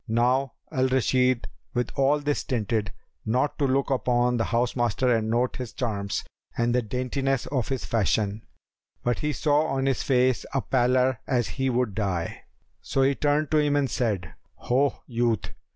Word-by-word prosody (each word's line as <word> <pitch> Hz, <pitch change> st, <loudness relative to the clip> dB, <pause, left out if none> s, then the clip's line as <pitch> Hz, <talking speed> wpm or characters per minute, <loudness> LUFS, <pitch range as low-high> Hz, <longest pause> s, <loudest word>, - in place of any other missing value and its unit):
Now 125 Hz, +3 st, +1 dB, 0.2 s
Al 130 Hz, -3 st, +2 dB
Rashid 130 Hz, -1 st, +2 dB, 0.3 s
with 125 Hz, 0 st, 0 dB
all 140 Hz, +2 st, +3 dB
this 145 Hz, 0 st, 0 dB
stinted 110 Hz, -6 st, -1 dB, 0.3 s
not 125 Hz, +8 st, 0 dB
to 140 Hz, -, +2 dB
look 135 Hz, +1 st, +1 dB
upon 125 Hz, -1 st, +2 dB
the 115 Hz, -, +1 dB
house 120 Hz, +1 st, 0 dB
master 120 Hz, +1 st, +2 dB
and 110 Hz, -1 st, -1 dB
note 120 Hz, +2 st, 0 dB
his 125 Hz, -4 st, -6 dB
charms 100 Hz, -6 st, -2 dB, 0.3 s
and 120 Hz, 0 st, +1 dB
the 125 Hz, -, +3 dB
daintiness 130 Hz, +3 st, -1 dB
of 130 Hz, -5 st, -1 dB
his 135 Hz, -2 st, -3 dB
fashion; 105 Hz, -1 st, 0 dB, 0.6 s
but 120 Hz, 0 st, 0 dB
he 150 Hz, -, 0 dB
saw 150 Hz, +1 st, +2 dB
on 135 Hz, -1 st, -1 dB
his 135 Hz, -2 st, +1 dB
face 130 Hz, -1 st, +2 dB
a 135 Hz, -, +2 dB
pallor 125 Hz, -1 st, +2 dB
as 120 Hz, -6 st, +1 dB
he 135 Hz, +6 st, -1 dB
would 125 Hz, -4 st, 0 dB
die; 95 Hz, -4 st, -3 dB, 0.4 s
so 135 Hz, -, 0 dB
he 135 Hz, +1 st, +4 dB
turned 145 Hz, +2 st, 0 dB
to 155 Hz, -, +4 dB
him 145 Hz, -1 st, +2 dB
and 140 Hz, -2 st, +1 dB
said, 95 Hz, -, -1 dB, 0.2 s
"Ho, 135 Hz, +3 st, 0 dB
youth!" 115 Hz, -5 st, -1 dB
125 Hz, 170 wpm, -26 LUFS, 115-135 Hz, 0.6 s, he